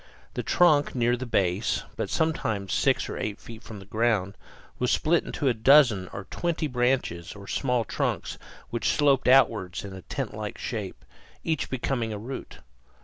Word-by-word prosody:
The - - -2
trunk, 155 -7 +3
near 120 0 +2
the 125 +1 -6
base, 95 -1 +1
but - - -3
sometimes 110 - -1
six - - +2
or - - -5
eight 105 -1 -3
feet 115 -1 -11
from 110 - -9
the 95 - -11
ground, 110 -2 0 0.4
was 125 - +1
split 165 +2 +2
into 145 - -3
a 125 - +4
dozen 115 -5 +5
or 100 - -6
twenty 170 -2 -1
branches 125 - -1
or 100 -1 -11
small 125 -4 0
trunks - - -2 0.3
which 120 - 0
sloped 140 -3 +3
outward 110 -8 +4
in 95 -1 -8
tent - - -3
like - - -5
shape, - - -5 0.4
each 160 -3 -1
becoming 120 -3 -1
a 105 - -4
root. 120 +6 -8
120 Hz, 165 wpm, -27 LUFS, 105-135 Hz, 0.4 s, dozen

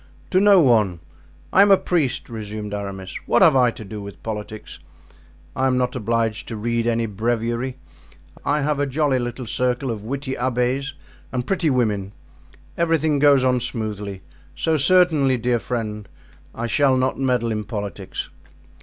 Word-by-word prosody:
"To 185 - +4
no 200 -1 +6
one. 110 - +3 0.5
I 190 - +7
am 200 - +6
a 195 - +7
priest," 155 -10 -1
resumed 105 -2 -6
Aramis. 100 -2 -5
"What - - +4
have - - +6
I 125 -2 +5
to 110 -2 -8
do 105 +1 -7
with 100 -1 -10
politics? 110 -4 -6 0.8
I 130 0 +1
am 130 -1 +2
not 125 0 0
obliged 115 -1 -1
to 115 - -5
read 115 +2 -1
any 115 -1 +1
breviary. 115 +4 -2 0.7
I 150 +1 +1
have 145 0 0
a 145 - +1
jolly 140 -1 +1
little 120 +1 -4
circle 125 +2 -1
of 105 -2 -5
witty 135 +3 -4
abbés 130 +3 -1 0.4
and 125 -1 -2
pretty 180 -4 +1
women; 105 -7 0 0.7
everything 160 -3 +2
goes 140 -2 +5
on 125 -1 +3
smoothly, 105 -5 -5 0.3
so 160 - +1
certainly, 155 -4 +4
dear 120 0 0
friend, 105 -4 -4 0.5
I 115 - -3
shall 130 +2 +3
not 130 +1 0
meddle 125 -3 +1
in 105 -1 -2
politics." 100 -3 -5
120 Hz, 160 wpm, -22 LUFS, 110-135 Hz, 0.8 s, I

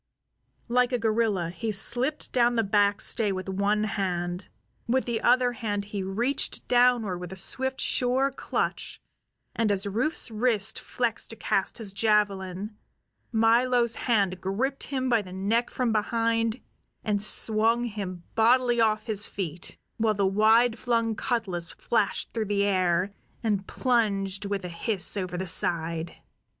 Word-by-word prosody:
Like 250 +1 +2
a 250 - +1
gorilla 215 -6 0
he 220 +5 -3
slipped 250 +8 +2
down 240 -1 +3
the 225 - +2
backstay 205 +1 +2
with 185 0 -5
one 200 +2 0
hand; 180 -3 -3 0.4
with 255 +3 +1
the 235 -2 -2
other 245 0 +3
hand 210 -4 -3
he 200 - -2
reached 230 +9 -2
downward 240 -7 +3
with 180 0 -8
a - - -6
swift, 260 +8 0
sure 260 +2 +1
clutch, 265 - -3 0.6
and 225 -2 +1
as 195 0 -1
Rufe's 230 +6 +1
wrist 220 -2 +1
flexed 235 -3 -3
to 225 - -5
cast 195 - -1
his 210 -5 -5
javelin 200 -1 0 0.6
Milo's 235 +1 +3
hand 200 -8 0
gripped 245 +9 -2
him 260 -2 -2
by 235 -3 +3
the 185 -3 -11
neck 215 +6 0
from 250 -3 -1
behind 230 +2 0 0.4
and 205 -2 0
swung 225 +2 +3
him 200 -6 -5
bodily 240 +1 +3
off 215 -1 +1
his 210 -3 0
feet, 175 -4 -5 0.2
while 220 -1 +1
the 200 -1 +1
wide 220 +4 +3
flung 230 -2 0
cutlas 185 -9 -2
flashed 215 -4 -1
through 225 -2 -1
the 200 0 0
air 185 -1 +1 0.3
and 205 -3 -1
plunged 200 -5 0
with 200 -2 -3
a - - -5
hiss 185 +4 -1
over 185 -3 -3
the 190 - -3
side. 170 -1 -1
215 Hz, 145 wpm, -26 LUFS, 195-235 Hz, 0.6 s, down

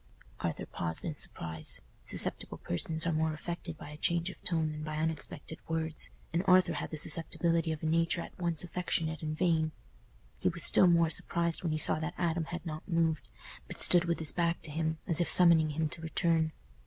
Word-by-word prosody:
Arthur - - -4
paused 80 -1 -5
in 160 - -4
surprise. 80 - -4 0.3
Susceptible - - -4
persons 160 - -1
are 170 - 0
more 160 0 0
affected 170 +1 -7
by 150 - -10
a 150 - -10
change 170 +3 0
of - - -17
tone 160 -3 +1
than 150 0 -7
by 155 0 -5
unexpected 160 0 -4
words, 160 -1 -4 0.2
and 170 - +1
Arthur 185 0 +5
had - - -5
the 155 - -6
susceptibility 165 +1 +1
of 155 -1 -6
a - - -2
nature 165 +2 +1
at - - -10
once 170 -3 -1
affectionate 165 -3 -2
and 155 -1 -4
vain. 160 -3 +1 0.7
He - - +1
was - - -5
still 185 - +7
more 170 -2 +3
surprised 170 -1 +1
when 170 - -2
he 155 - -1
saw 155 - +3
that 155 -1 -5
Adam 170 -2 -1
had 175 +2 -7
not 155 -1 -7
moved, 165 -3 -1 0.4
but - - -7
stood 175 -1 +7
with 170 -1 -1
his 160 -3 +1
back 170 -1 -1
to 155 - -5
him, 160 +1 -2
as 165 0 +5
if 175 - 0
summoning 170 -3 +8
him 155 +1 -1
to 160 - -9
return. 165 0 0
160 Hz, 205 wpm, -31 LUFS, 155-170 Hz, 0.7 s, summoning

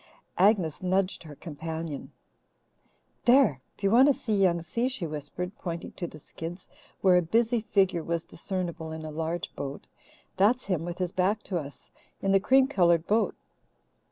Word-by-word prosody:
Agnes 185 -6 +3
nudged 185 +1 0
her 150 -3 -10
companion. 160 -1 -6 1.1
"There! 240 - +5 0.2
If - - -20
you 195 - +3
want 255 +5 +7
to 285 - +4
see 220 - -3
Young 180 -4 +2
Si," 230 +9 -1
she 260 -9 -2
whispered, 155 +5 -5
pointing 170 -2 -5
to 175 - -5
the 155 - -11
skids, 165 +4 -8 0.3
where 185 -2 +6
a - - +4
busy 230 +7 +2
figure 190 -5 +2
was 170 0 -2
discernible 170 -3 -4
in 160 0 -6
a 155 - -5
large 165 +2 -3
boat, 140 0 -6 0.5
"that's 230 +6 +3
him, 175 -4 -1
with 175 0 -5
his 180 -2 -1
back 195 +4 +1
to 180 -3 -1
us, 145 -2 -10 0.3
in 195 - 0
the 195 - +5
cream 265 +6 +4
coloured 170 - +3
boat. 220 +2 +1
180 Hz, 170 wpm, -28 LUFS, 165-200 Hz, 1.1 s, want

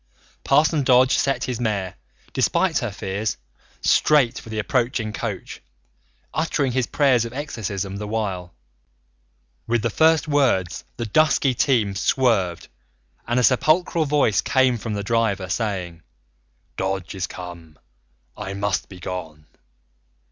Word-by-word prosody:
Parson 150 +2 +3
Dodge 130 0 +4
set 135 0 0
his 125 -2 -3
mare, 100 -6 -1 0.4
despite 170 +7 +2
her 120 - -2
fears, 100 +2 -3 0.4
straight 135 -6 +3
for - - -12
the 110 - -5
approaching 115 -1 -1
coach, 105 -4 -5 0.7
uttering 150 -4 0
his 130 -1 0
prayers 135 -5 +3
of 115 0 -6
exorcism 105 -9 -4
the 105 +1 -5
while. 100 -5 -3 1.2
With 115 -1 +1
the 115 - 0
first 160 +3 +3
words 130 - +1
the 120 - -3
dusky 140 +2 +3
team 115 -6 +2
swerved 100 -5 +1 0.6
and 120 +1 +1
a - - +2
sepulchral 155 +6 +3
voice 140 - +2
came 130 +3 +2
from 110 -1 -4
the 100 - -3
driver, 105 -4 0
saying: 90 -4 -3 0.8
"Dodge 95 -2 -2
is 95 -3 -3
come! 85 -4 -10 0.6
I 95 +1 -6
must 100 0 -1
be 95 - -11
gone." 80 -4 -6
115 Hz, 130 wpm, -22 LUFS, 95-130 Hz, 1.2 s, Dodge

